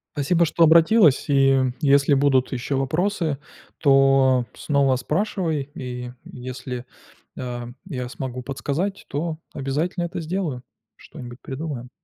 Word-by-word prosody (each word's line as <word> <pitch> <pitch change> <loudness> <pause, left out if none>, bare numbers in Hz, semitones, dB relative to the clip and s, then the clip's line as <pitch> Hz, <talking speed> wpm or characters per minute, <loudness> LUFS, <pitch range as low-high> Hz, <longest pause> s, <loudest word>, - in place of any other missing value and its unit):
Спасибо, 160 +4 +2
что 165 +1 +2
обратилась, 165 - +5
и 135 -2 +4
если 140 -1 +4
будут 135 -2 +2
ещё 130 +2 -2
вопросы, 160 +3 0 0.4
то 135 -3 +4
снова 140 -3 +1
спрашивай, 160 - -1
и 125 -1 -6
если, 125 0 -7 0.5
а, 120 -1 -5 0.2
я 125 -9 -5
смогу 130 -1 -5
подсказать, 145 +9 -3
то 155 +2 -3 0.2
обязательно 155 +7 -2
это 170 - -5
сделаю. 160 -6 -3 0.3
Что-нибудь 120 0 -11
придумаем. 135 -3 -6
140 Hz, 115 wpm, -23 LUFS, 130-160 Hz, 0.5 s, обратилась